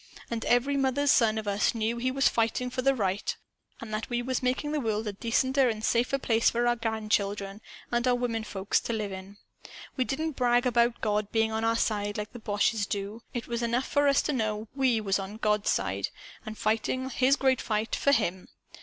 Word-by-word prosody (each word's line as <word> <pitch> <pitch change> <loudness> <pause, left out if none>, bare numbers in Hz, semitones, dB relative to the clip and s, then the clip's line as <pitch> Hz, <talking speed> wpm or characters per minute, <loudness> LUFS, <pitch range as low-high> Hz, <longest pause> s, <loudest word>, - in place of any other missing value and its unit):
And 230 -1 -2
every 255 +4 +2
mother's 275 +1 +2
son 220 -3 +3
of 215 -1 -4
us 205 +3 +1
knew 225 +1 -1
we 250 +2 0
was 270 0 +3
fighting 230 +2 0
for 255 - -2
the 270 +1 +3
Right; 195 -4 -1 0.4
and 225 -2 -8
that 215 +1 -3
we 240 0 -1
was 260 0 -1
making 260 +4 -1
the 305 - 0
world 220 -3 -1
a 210 - -3
decenter 260 +5 +2
and 215 -1 -4
safer 245 +4 +2
place 230 -4 +2
for 240 +1 0
our 240 0 +3
grandchildren 210 -3 -2 0.3
and 240 +1 +1
our 250 - +4
womenfolks 225 -5 -1
to 235 - -4
live 210 -3 -2
in. 190 +1 -9 0.6
We 260 - +3
didn't 310 +5 -2
brag 245 -2 +2
about 235 -1 +2
God 210 -1 0
being 220 -1 +2
on 220 0 -2
our 225 0 +2
side, 205 -2 -1
like 210 0 -5
the 240 - -8
boches 205 -1 0
do. 205 +3 -4
It 240 - -3
was 235 0 -3
enough 235 +2 0
for 290 -1 +2
us 280 0 +4
to 300 - -1
know 215 -3 -2
WE 260 -5 +2
was 195 -2 0
on 195 +2 -6
GOD'S 210 -1 +1
side - - 0 0.4
and 220 0 -6
fighting 225 +5 -1
His 260 +3 +3
great 265 -3 +2
fight 215 0 -1
for 280 - +2
Him. 190 -8 0
230 Hz, 210 wpm, -28 LUFS, 215-255 Hz, 0.6 s, our